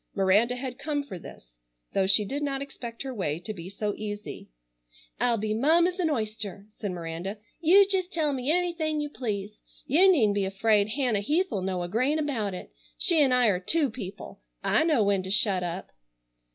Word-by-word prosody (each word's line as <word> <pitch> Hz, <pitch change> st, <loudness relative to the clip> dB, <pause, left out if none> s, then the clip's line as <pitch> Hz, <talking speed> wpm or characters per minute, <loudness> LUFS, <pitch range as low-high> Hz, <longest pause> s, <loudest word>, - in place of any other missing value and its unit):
Miranda 205 Hz, +5 st, +3 dB
had 250 Hz, 0 st, -6 dB
come 290 Hz, 0 st, -2 dB
for 195 Hz, -10 st, -8 dB
this, -, -, -14 dB, 0.3 s
though 190 Hz, -1 st, +2 dB
she 200 Hz, +2 st, +4 dB
did 280 Hz, +8 st, -4 dB
not 275 Hz, -2 st, -1 dB
expect 240 Hz, -4 st, -7 dB
her 265 Hz, -1 st, -5 dB
way 170 Hz, -9 st, -2 dB
to 175 Hz, +6 st, -6 dB
be 175 Hz, -2 st, -8 dB
so 205 Hz, +1 st, -3 dB
easy. 210 Hz, -1 st, -7 dB, 0.7 s
"I'll 240 Hz, -1 st, +2 dB
be 215 Hz, 0 st, -2 dB
mum 315 Hz, +9 st, +4 dB
as 360 Hz, +1 st, -2 dB
an 340 Hz, -3 st, +1 dB
oyster," 215 Hz, -6 st, -3 dB
said 210 Hz, -1 st, -6 dB
Miranda. 175 Hz, +3 st, -5 dB, 0.2 s
"You 375 Hz, +5 st, +6 dB
jest 380 Hz, -2 st, 0 dB
tell 310 Hz, -5 st, 0 dB
me 260 Hz, +1 st, -2 dB
anything 335 Hz, -3 st, 0 dB
you 295 Hz, -1 st, -3 dB
please. 210 Hz, -5 st, -4 dB, 0.3 s
You 365 Hz, +8 st, +5 dB
needn't 225 Hz, -, +3 dB
be 200 Hz, -1 st, 0 dB
afraid 205 Hz, +1 st, +2 dB
Hannah 240 Hz, -2 st, 0 dB
Heath'll 295 Hz, -, 0 dB
know 185 Hz, -1 st, -2 dB
a -, -, -3 dB
grain 255 Hz, -, +1 dB
about 235 Hz, -11 st, -2 dB
it. -, -, -9 dB, 0.3 s
She'n' 305 Hz, -7 st, +4 dB
I 250 Hz, -1 st, +4 dB
are 180 Hz, -3 st, +1 dB
two 285 Hz, -, +1 dB
people. 200 Hz, -5 st, -8 dB, 0.2 s
I -, -, +3 dB
know 305 Hz, -9 st, +3 dB
when 200 Hz, -1 st, +2 dB
to 185 Hz, -, -7 dB
shut 195 Hz, -1 st, +3 dB
up." 180 Hz, +2 st, -5 dB
225 Hz, 190 wpm, -27 LUFS, 195-290 Hz, 0.7 s, You